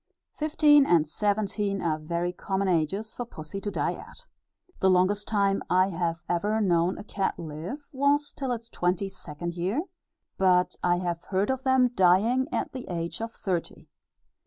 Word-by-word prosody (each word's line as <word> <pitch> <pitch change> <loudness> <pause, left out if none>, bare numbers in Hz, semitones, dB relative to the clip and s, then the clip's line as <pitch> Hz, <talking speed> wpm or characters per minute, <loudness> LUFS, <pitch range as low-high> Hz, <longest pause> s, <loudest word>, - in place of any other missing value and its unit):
Fifteen 300 -1 +5
and 165 -3 +4
seventeen 205 +2 -1
are 160 -3 -1
very 170 +3 -2
common 195 +1 -2
ages 190 +5 0
for 245 - -4
Pussy 195 -4 -8
to 205 - -3
die - - -1
at. - - -12 0.5
The 190 - +4
longest 190 +3 +2
time 200 -2 +1
I 185 +1 +4
have 170 -2 -2
ever 205 +5 0
known 175 -3 +2
a - - -7
cat 200 -2 -2
live, 170 - -7
was 285 +2 +2
till 265 -3 -3
its 230 -1 -4
twenty 185 -2 -1
second 170 -2 -6
year, 190 - -1 0.6
but 180 -1 +3
I 175 0 +3
have 175 -1 -3
heard 195 +4 0
of 265 -1 -2
them 260 -1 +4
dying 210 +7 +4
at - - -2
the 255 -2 -7
age 170 +3 -4
of 225 0 -3
thirty. 180 -6 -4
190 Hz, 165 wpm, -27 LUFS, 175-225 Hz, 0.6 s, Fifteen